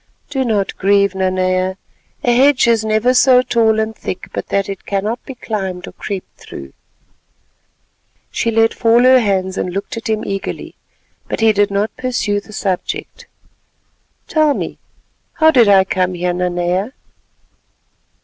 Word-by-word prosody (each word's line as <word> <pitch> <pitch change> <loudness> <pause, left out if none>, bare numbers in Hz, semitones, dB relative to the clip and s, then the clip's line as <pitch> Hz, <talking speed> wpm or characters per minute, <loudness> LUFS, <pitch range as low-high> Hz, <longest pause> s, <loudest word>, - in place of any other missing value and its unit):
"Do 270 -2 0
not 210 -5 -1
grieve, 200 0 +3
Nanea, 185 0 0 0.5
a 240 -1 +3
hedge 270 0 +4
is 230 -2 +3
never 220 +3 +2
so 255 0 +5
tall 225 -3 +2
and 220 0 -2
thick 185 - -6
but - - -4
that 200 -1 0
it 195 -1 -7
cannot 210 +4 -2
be 270 - -8
climbed 190 -6 -4
or - - -8
crept 195 -3 -7
through." 70 0 -10 1.6
She 230 - -1
let 225 0 +2
fall 230 +1 +3
her 255 0 +7
hands 190 -4 -1
and 180 - -2
looked 195 +4 -5
at 225 - -5
him 215 -1 -1
eagerly, 195 -1 -5 0.5
but - - -3
he 225 -1 +4
did 205 0 +2
not 200 +2 -1
pursue 245 -5 -1
the 210 - -15
subject. 195 -3 -4 1.0
"Tell 310 -3 +2
me, - - -5 0.5
how 315 0 +4
did 245 -7 +5
I 195 -1 +6
come 185 -1 -1
here, 175 0 -1
Nanea?" 180 +5 -1
205 Hz, 150 wpm, -17 LUFS, 190-235 Hz, 1.6 s, her